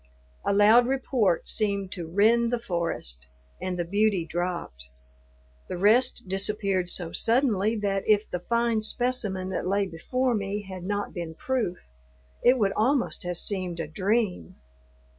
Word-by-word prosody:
A - - +1
loud 215 +4 +6
report 250 -8 0
seemed 200 -3 0
to 170 -3 -5
rend 230 +5 +3
the 245 - +1
forest, 170 - -3 0.3
and 185 -1 -3
the 175 - -1
beauty 200 -1 +1
dropped. 170 - -4 0.8
The 180 - -3
rest 240 +6 +3
disappeared 195 -1 0
so 175 -2 -1
suddenly 225 -3 +2
that 200 -2 -2
if 210 0 +4
the 180 - -4
fine 235 +3 0
specimen 215 -5 -1
that 190 - -3
lay 200 +1 +1
before 250 +9 -1
me 205 -1 -2
had 185 -2 -8
not 205 +1 -2
been 170 -3 -6
proof, 240 -5 -2 0.7
it 250 +2 +5
would 200 -4 +2
almost 255 +4 +1
have 175 -1 -1
seemed 185 -4 -2
a 165 - -2
dream. 190 - -1
200 Hz, 145 wpm, -26 LUFS, 180-230 Hz, 0.8 s, loud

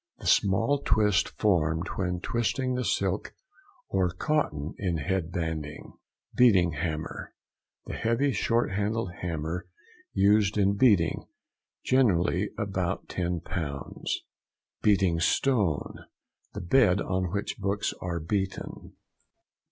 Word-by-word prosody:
—The - - -12
small 115 +9 +3
twist 105 -3 +2
formed 85 -5 +1
when 90 -2 -2
twisting 125 +4 -1
the 125 0 -1
silk - - -1 0.5
or 95 -2 +1
cotton 90 - -1
in 90 -5 -1
head 85 +3 -2
banding. 80 -3 -4 0.4
BEATING 95 -9 +5
HAMMER.—The 80 0 -7
heavy 115 +5 +1
short 115 +1 +1
handled 105 0 -1
hammer 85 0 -3 0.4
used 100 +1 +3
in 100 0 +3
beating 100 -7 +3 0.6
(generally 100 -6 +2
about 95 -3 -2
10 90 -2 -2
lbs.). 70 -6 -5 0.7
BEATING 95 -5 +3
STONE.—The 100 - -2
bed 100 0 +4
on 95 -2 -1
which 100 +2 -3
books 100 +1 -1
are 85 -2 -2
beaten. 95 +4 -4
95 Hz, 105 wpm, -28 LUFS, 85-105 Hz, 0.7 s, BEATING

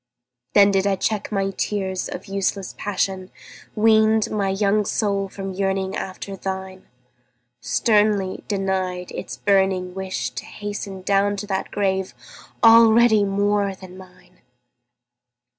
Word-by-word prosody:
Then 200 0 +7
did 195 0 +1
I 195 - +2
check 210 +2 -2
my 195 -1 0
tears 190 -1 -3
of - - -7
useless 195 -1 -2
passion, 190 -2 -2 0.5
Weaned 220 0 +3
my 200 -2 0
young 200 +2 +1
soul 200 -1 -1
from 195 0 -6
yearning 195 0 -1
after 195 +1 -6
thine, 190 0 -6 0.7
Sternly 210 - +1
denied 190 -3 -2
its - - -6
burning 190 -2 +1
wish 185 -11 -4
to - - -7
hasten 205 -2 -6
Down 200 +1 +2
to 205 - -5
that 195 -2 -3
grave 190 -2 -1 0.5
already 225 -1 +6
more 200 0 0
than 185 -1 -12
mine! 180 -1 -17
195 Hz, 125 wpm, -22 LUFS, 190-205 Hz, 0.7 s, Then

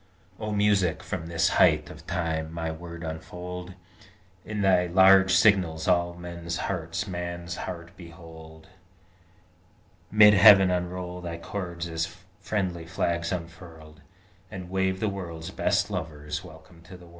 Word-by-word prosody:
O 110 -1 -4
Music, 100 -4 +1
from 80 - -5
this 85 -1 +1
height 75 -4 +3
of 80 0 -13
time 80 -3 -2
my 80 -1 -3
Word 85 +1 -9
unfold: 90 +3 -7 0.7
In 105 -1 -4
thy 90 -2 +3
large 95 +1 +6
signals 90 -6 +3
all 85 -1 +2
men's 85 -1 -6
hearts 85 +1 -3
Man's 85 -1 -5
heart 85 -1 -7
behold: 80 -2 -13 1.4
Mid 105 0 +7
heaven 100 -2 +8
unroll 90 0 -3
thy 85 -1 -5
chords 85 -1 -5
as 80 +1 -4 0.2
friendly 95 -5 -3
flags 85 -2 -1
unfurled, 80 -3 -8 0.5
And 90 -2 -8
wave 95 0 0
the 110 - +1
world's 85 -5 -6
best - - 0
lover's 75 -4 -5
welcome 85 -2 -15
to 90 +2 -11
the 90 - -15
world. - - -17
85 Hz, 135 wpm, -26 LUFS, 80-95 Hz, 1.4 s, heaven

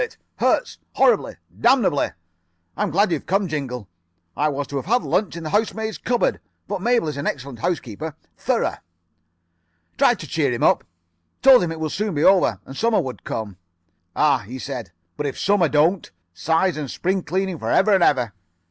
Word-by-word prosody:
It 480 - -4 0.2
hurts. - - +1
Horribly. - - +3 0.2
Damnably. 235 - +3 0.7
I'm 210 -1 -1
glad 195 +4 +2
you've 160 - -2
come, 195 +1 +1
Jingle. 130 - -4 0.5
I 150 +1 +1
was 145 0 -3
to 140 - -3
have 135 - -5
had 245 +4 +2
lunch 195 -4 0
in 170 - -6
the 155 - -5
housemaid's 220 0 -1
cupboard. 245 -1 0 0.3
But 200 -2 -3
Mabel 235 -4 +2
is 150 -2 -4
an 140 - -3
excellent 135 -3 -4
housekeeper. 160 - -3 0.2
Thorough.' - - -1 1.2
"Tried - - +4
to - - -7
cheer - - 0
him - - -2
up. - - +4 0.6
Told 265 -3 +8
him 175 -2 -1
it 165 - -6
would 155 -2 -2
soon 205 -1 -2
be 145 - +1
over. 180 - +4
And 135 - -10
Summer 230 +6 +2
would 130 -2 -5
come. 105 -4 -5 0.6
"'Ah,' 145 -3 +3
he 120 +4 -8
said, 125 -8 -6 0.3
'but 150 - -2
if 135 - -5
Summer 200 -5 +2
don't! 160 +5 +2 0.2
Size 160 - +1
and 145 -3 -4
spring 185 +7 -1
cleaning 185 0 -2
for - - -3
ever 205 +1 +4
and 190 -3 +4
ever. 125 - +2
165 Hz, 185 wpm, -22 LUFS, 140-200 Hz, 1.2 s, Told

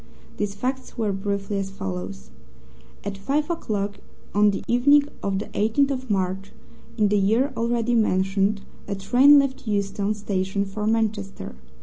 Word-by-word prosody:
These 205 -1 -2
facts 260 +6 -4
were 220 -3 0
briefly 200 +1 -2
as 195 -1 -3
follows: 90 - -6 0.7
At 200 -1 -5
five 295 - 0
o'clock 205 -10 -3 0.3
on 210 +1 +5
the 200 - -2
evening 285 +5 +5 0.2
of 195 -1 -1
the 205 - -3
18th 250 +7 +1
of 260 -2 -4
March 195 0 -1 0.4
in 210 -2 +3
the 205 0 +3
year 230 +8 +2
already 235 +1 0
mentioned 195 -2 +2 0.3
a 200 - -2
train 255 +9 +6
left 275 -3 0
Euston 200 0 0
Station 200 -1 -1
for 210 +2 -4
Manchester. 215 -3 -1
205 Hz, 145 wpm, -24 LUFS, 195-235 Hz, 0.7 s, train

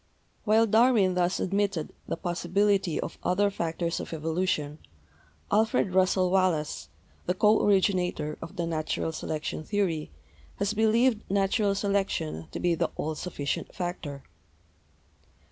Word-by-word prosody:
While 220 +1 +5
Darwin 220 -3 +4
thus 180 0 +1
admitted 195 -4 -1
the - - -2
possibility 185 0 +1
of - - -5
other 200 +3 +2
factors 170 -1 -2
of - - -6
evolution, 160 -2 -1 0.7
Alfred 210 -3 +2
Russell 185 -1 +3
Wallace, 185 -6 0 0.4
the 180 - +1
co 210 +3 +4
originator 180 -6 +1
of 175 - -8
the 170 - -1
natural 160 0 -2
selection 155 0 -4
theory, 180 -6 -1 0.5
has 205 - -1
believed 225 +2 +3
natural 200 +1 +2
selection 195 - -1
to - - -6
be 175 -1 +2
the 165 - 0
all 155 - -2
sufficient 150 -3 -4
factor. 175 -6 -5
185 Hz, 125 wpm, -28 LUFS, 165-205 Hz, 0.7 s, While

